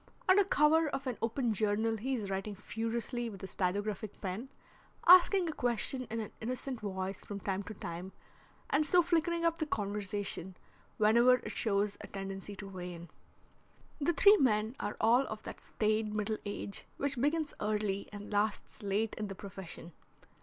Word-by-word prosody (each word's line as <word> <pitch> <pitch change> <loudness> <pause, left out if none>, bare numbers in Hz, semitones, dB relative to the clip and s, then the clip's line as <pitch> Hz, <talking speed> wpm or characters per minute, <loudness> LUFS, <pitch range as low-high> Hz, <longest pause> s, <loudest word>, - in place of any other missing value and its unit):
Under 380 +2 +7
cover 315 -3 +4
of 275 0 -4
an 255 -3 -3
open 230 0 0
journal 215 +2 +1
he 260 +5 -1
is 205 -5 -4
writing 195 +2 -3
furiously 230 +3 -3
with 195 -3 -10
a - - -4
stylographic 205 +3 -2
pen, 205 +7 -4 0.6
asking 365 +1 +7
a 320 - -2
question 245 0 0
in 225 - -2
an 215 - -5
innocent 255 +2 -4
voice 190 -1 -4
from 200 -1 -6
time 195 0 -2
to 210 +2 -8
time 175 +1 -6 0.6
and 290 +2 +4
so 350 +3 +4
flickering 335 0 +1
up 335 0 +2
the 315 - -1
conversation 200 - -3 0.4
whenever 235 +4 +6
it 250 - -6
shows 205 -1 0
a - - -8
tendency 195 +1 -6
to 195 0 -7
wane. 180 -3 -7 0.9
The 315 +4 +2
three 405 +5 +7
men 220 - +2
are 205 - -3
all 240 +5 +4
of 215 0 -6
that - - -7
staid 215 0 0
middle 215 0 -1
age 200 0 -5
which 280 -3 -1
begins 300 +2 +1
early 210 -2 -1
and 205 0 -8
lasts 205 +1 -1
late 205 +2 0
in 210 - -2
the 195 - -6
profession. 185 -3 -9
215 Hz, 165 wpm, -33 LUFS, 200-260 Hz, 0.9 s, Under